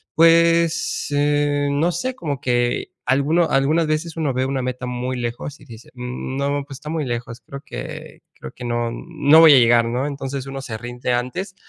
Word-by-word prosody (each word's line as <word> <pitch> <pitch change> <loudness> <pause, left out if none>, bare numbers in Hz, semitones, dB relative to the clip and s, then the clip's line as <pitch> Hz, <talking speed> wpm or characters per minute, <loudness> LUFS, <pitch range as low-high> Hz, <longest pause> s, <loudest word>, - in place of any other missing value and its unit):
pues, 165 0 +3
eh, 145 0 +1
no 155 +5 +1
sé, 255 +10 -2
como 145 - -4
que 120 -1 0
alguno 150 +6 +2
algunas 155 +4 +2
veces 155 +1 -2
uno 155 -4 0
ve 130 +1 0
una 135 0 -2
meta 125 0 -4
muy 125 +1 -3
lejos 120 +4 -5
y - - -16
dice: 115 0 -13
"Mm, 125 +1 -5
no, 140 +1 -1
pues 140 -2 -9
está 150 +2 -9
muy 160 -2 -1
lejos, 120 -1 -5
creo 140 0 -9
que - - -8
creo - - -10
que 125 - -11
no 120 -1 -1
no 155 +2 +3
voy 160 -2 +9
a - - +7
llegar", 120 -1 +5
¿no?, 120 +3 -1
entonces, 140 -2 -5
uno 135 0 -6
se 115 -4 -6
rinde 120 +2 -3
antes. 155 +11 -3
140 Hz, 195 wpm, -21 LUFS, 125-155 Hz, -, voy